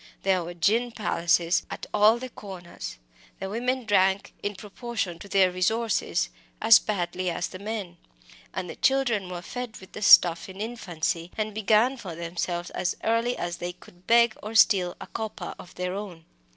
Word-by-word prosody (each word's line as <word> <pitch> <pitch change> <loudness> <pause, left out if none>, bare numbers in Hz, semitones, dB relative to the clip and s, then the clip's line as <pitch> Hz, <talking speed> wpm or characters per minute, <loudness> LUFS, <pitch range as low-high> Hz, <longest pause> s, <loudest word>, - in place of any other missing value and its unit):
There 190 -2 +2
were 175 +1 -7
gin 225 +8 +2
palaces 170 -5 +2
at - - -6
all 215 +3 +5
the 255 +1 -6
corners; 185 -5 -8 0.4
the 195 0 -4
women 250 +3 -1
drank, 195 -2 +2
in 205 0 -3
proportion 200 -3 -4
to 200 - -11
their 190 -1 +4
resources, 220 - 0 0.3
as 225 - +8
badly 185 -2 -2
as 175 +1 -2
the 185 - -9
men, 200 -4 -5 0.5
and 185 -1 -4
the - - -7
children 240 -8 +1
were 175 -1 -6
fed 245 +2 -6
with 190 - -14
the - - -8
stuff 175 -3 +7
in 190 +1 -10
infancy, 175 -7 -3
and 215 -1 -2
began 220 +5 +3
for 190 -8 -7
themselves 175 +1 -3
as 175 - -1
early 230 +2 +1
as 175 0 -3
they 175 0 -4
could 180 0 -19
beg 235 -1 +5
or 215 +2 -7
steal 185 -5 +5
a - - -7
copper 220 -1 -5
of 180 - -12
their 180 0 -3
own. 190 -5 -7
195 Hz, 175 wpm, -26 LUFS, 175-220 Hz, 0.5 s, as